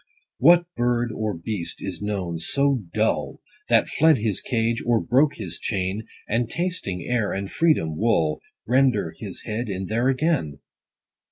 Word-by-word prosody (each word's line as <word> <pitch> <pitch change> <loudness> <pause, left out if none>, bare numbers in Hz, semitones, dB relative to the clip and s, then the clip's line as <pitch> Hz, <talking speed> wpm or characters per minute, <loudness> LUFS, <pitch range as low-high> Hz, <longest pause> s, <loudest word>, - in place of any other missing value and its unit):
What 175 0 +7
bird, 120 -1 +1
or 110 -4 -3
beast 85 0 -4
is 95 -3 -6
known 95 -5 -3
so 135 +5 +1
dull, - - 0 0.3
That - - +4
fled 160 -1 +4
his 105 -4 -1
cage, 115 0 0
or 120 -1 +2
broke 135 +6 +2
his - - -7
chain, 95 +1 -2 0.2
30 - - -1
And, 120 - -3
tasting 170 - -3
air 120 -4 0
and 100 0 -4
freedom, 150 - +2
wull 85 -9 +1 0.2
Render 130 +2 +2
his - - -8
head 110 +2 -3
in 95 -1 -3
there 115 +6 +1
again 135 - 0
115 Hz, 155 wpm, -24 LUFS, 95-130 Hz, 0.3 s, What